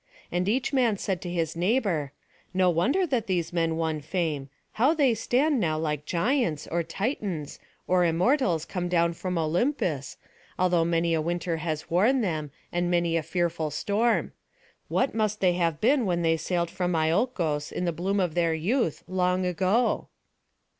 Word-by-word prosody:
And 180 +2 0
each 255 +5 0
man 240 -6 +2
said 190 -2 -2
to 175 - -5
his 165 -2 -2
neighbour: 180 - 0 0.4
"No 185 -1 +4
wonder 255 - +2
that 255 -9 -1
these 175 -3 -1
men 165 -2 0
won 160 -2 -1
fame. 155 -3 -2 0.2
How 265 +9 +2
they 275 -6 +3
stand 255 +6 +1
now 155 -6 0
like 150 -2 -2
Giants, 180 - 0
or 170 +1 -1
Titans, 180 - -3 0.3
or 180 -1 +3
Immortals 175 - +2
come 180 -2 -3
down 170 -1 +2
from 180 +1 -3
Olympus, 165 - -1 0.4
though 180 -2 +3
many 170 0 +1
a 160 - +1
winter 170 +1 -2
has 155 -1 -4
worn 225 +10 +3
them, 155 -7 -2 0.2
and 175 0 0
many 170 -1 +1
a 165 - +2
fearful 165 -1 -1
storm. 210 - 0 0.6
What 265 - 0
must 215 -1 0
they 180 -2 +3
have 170 -3 0
been 255 -1 +3
when 175 -1 0
they 165 0 +3
sailed 170 +1 -1
from 180 -2 -1
Iolcos, 160 - 0
in 180 - -2
the 170 - +1
bloom 195 +5 -1
of 180 -4 0
their 170 -1 +1
youth, 185 - 0
long 185 0 +1
ago?" 185 +7 +1
175 Hz, 165 wpm, -27 LUFS, 165-210 Hz, 0.6 s, No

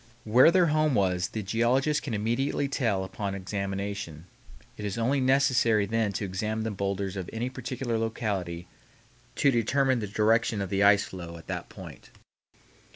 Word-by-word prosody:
Where 120 +7 +6
their 180 +1 +4
home 155 -3 +2
was 90 -3 +1
the 110 - -5
geologist 125 +8 +1
can 120 -6 -4
immediately 120 +7 0
tell 115 -8 0
upon 95 +1 -4
examination. 100 -3 -4 0.5
It 105 - -8
is 105 +1 -3
only 130 +4 +1
necessary 130 -5 +3
then 110 0 0
to 95 - -2
examine 110 +4 -3
the 110 - -2
bowlders 100 -1 -3
of 95 -3 -5
any 120 +3 -3
particular 125 -2 -3
locality 100 -7 -3 0.7
to 140 - +3
determine 130 +2 +2
the 105 - -3
direction 110 +2 +2
of 100 -2 -4
the 100 0 +1
ice 100 0 +6
flow 85 -2 -8
at 80 - -13
that - - -4
point. - - -11
110 Hz, 160 wpm, -27 LUFS, 100-125 Hz, 0.7 s, Where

